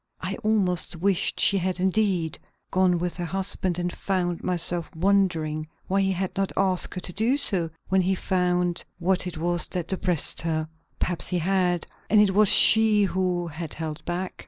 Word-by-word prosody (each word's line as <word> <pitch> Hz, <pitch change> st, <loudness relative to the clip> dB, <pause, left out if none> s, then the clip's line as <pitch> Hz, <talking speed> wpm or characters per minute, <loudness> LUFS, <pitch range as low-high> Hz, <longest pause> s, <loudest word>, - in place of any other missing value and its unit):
I -, -, -4 dB
almost 205 Hz, -7 st, 0 dB
wished 185 Hz, +2 st, 0 dB
she 200 Hz, -, +4 dB
had 185 Hz, 0 st, -2 dB
indeed 185 Hz, -4 st, 0 dB, 0.3 s
gone 185 Hz, -1 st, +3 dB
with 175 Hz, +1 st, -3 dB
her 175 Hz, -, -3 dB
husband, 190 Hz, 0 st, -1 dB
and 175 Hz, 0 st, -2 dB
found 175 Hz, -3 st, -2 dB
myself 175 Hz, -1 st, -3 dB
wondering 165 Hz, -4 st, 0 dB, 0.2 s
why 195 Hz, +1 st, +1 dB
he 195 Hz, 0 st, +1 dB
had 185 Hz, 0 st, -3 dB
not 195 Hz, 0 st, -1 dB
asked 190 Hz, -2 st, +1 dB
her -, -, -3 dB
to 180 Hz, -, -8 dB
do 225 Hz, +8 st, +1 dB
so 190 Hz, -, 0 dB, 0.2 s
when 190 Hz, 0 st, +3 dB
he 190 Hz, +1 st, +1 dB
found 180 Hz, -1 st, 0 dB
what 185 Hz, +1 st, 0 dB
it 175 Hz, -2 st, -6 dB
was 175 Hz, +2 st, +1 dB
that 175 Hz, -3 st, -4 dB
depressed 180 Hz, -4 st, 0 dB
her. 160 Hz, -1 st, -2 dB, 0.3 s
Perhaps 175 Hz, -2 st, -2 dB
he 180 Hz, -, -1 dB
had, 180 Hz, -1 st, 0 dB, 0.2 s
and 210 Hz, -, +5 dB
it 205 Hz, -2 st, +4 dB
was 210 Hz, 0 st, +4 dB
she 220 Hz, -2 st, +6 dB
who 185 Hz, -2 st, -1 dB
had 160 Hz, -1 st, -6 dB
held 155 Hz, -1 st, -6 dB
back. 175 Hz, +2 st, -4 dB
180 Hz, 180 wpm, -25 LUFS, 175-195 Hz, 0.3 s, she